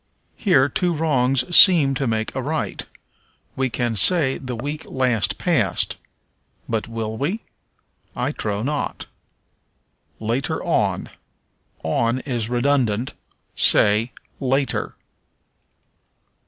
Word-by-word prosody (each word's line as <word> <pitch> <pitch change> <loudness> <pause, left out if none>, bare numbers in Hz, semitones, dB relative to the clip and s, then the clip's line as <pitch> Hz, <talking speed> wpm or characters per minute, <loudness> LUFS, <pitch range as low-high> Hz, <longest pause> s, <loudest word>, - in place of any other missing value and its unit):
Here 145 - +3
two 175 +5 -1
wrongs 135 -1 +1
seem 160 -8 +8
to 135 0 -2
make 110 -1 -2
a 130 - -3
right: 155 +4 -3 0.7
we 130 -1 0
can 120 -1 -2
say 135 - +3
the 130 -2 -6
week 145 +6 -5
last 125 -5 0
past. - - 0 0.7
But 115 -1 -2
will 110 -1 -5
we? 175 - -2 0.7
I 125 +3 -1
trow 105 -6 -3
not. 145 +3 -3 1.1
Later 115 +4 -2
on. - - 0 0.7
On 115 +10 0
is 120 -5 -3
redundant; 125 -2 0 0.4
say, 105 +4 +4 0.3
later. 135 -2 -1
130 Hz, 100 wpm, -21 LUFS, 115-145 Hz, 1.1 s, seem